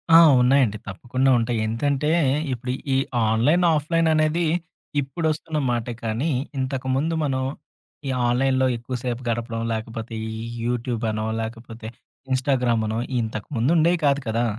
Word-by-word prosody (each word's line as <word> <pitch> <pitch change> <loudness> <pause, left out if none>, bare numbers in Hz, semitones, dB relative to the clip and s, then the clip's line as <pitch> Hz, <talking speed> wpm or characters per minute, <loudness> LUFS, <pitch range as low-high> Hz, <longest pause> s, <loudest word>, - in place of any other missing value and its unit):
ఆ! - - +12 0.2
ఉన్నాయండి. 125 -4 +3
తప్పకుండా 125 +7 -1
ఉంటాయి. 115 0 0
ఎంతంటే, 140 +6 0 0.4
ఇప్పుడు 125 +1 -4 0.2
ఈ - - +4 0.3
ఆన్‌లైన్, 145 +11 +3
ఆఫ్‌లైన్ 160 +2 +1
అనేది 155 +2 +2 0.6
ఇప్పుడొస్తున్న 155 +3 -2
మాటే 120 0 -2
కానీ, 115 +8 -1 0.3
ఇంతకుముందు 130 +4 -1
మనం 130 -3 0 0.7
ఈ - - +1 0.2
ఆన్‌లైన్‌‌‌‌‌లో 130 +2 +2
ఎక్కువసేపు 120 0 -4
గడపడం, 115 0 -2
లేకపోతే 115 +1 -5 0.2
ఈ 110 - -5 0.3
యూట్యూబనో 115 -3 -1
లేకపోతే 115 0 -7 0.4
ఇన్స్టాగ్రామనో 120 -4 +1 0.2
ఇంతకుముందుండేయి 145 +10 +1
కాదు 140 0 +3
కదా! 115 +2 +1
125 Hz, 110 wpm, -23 LUFS, 115-140 Hz, 0.7 s, ఆ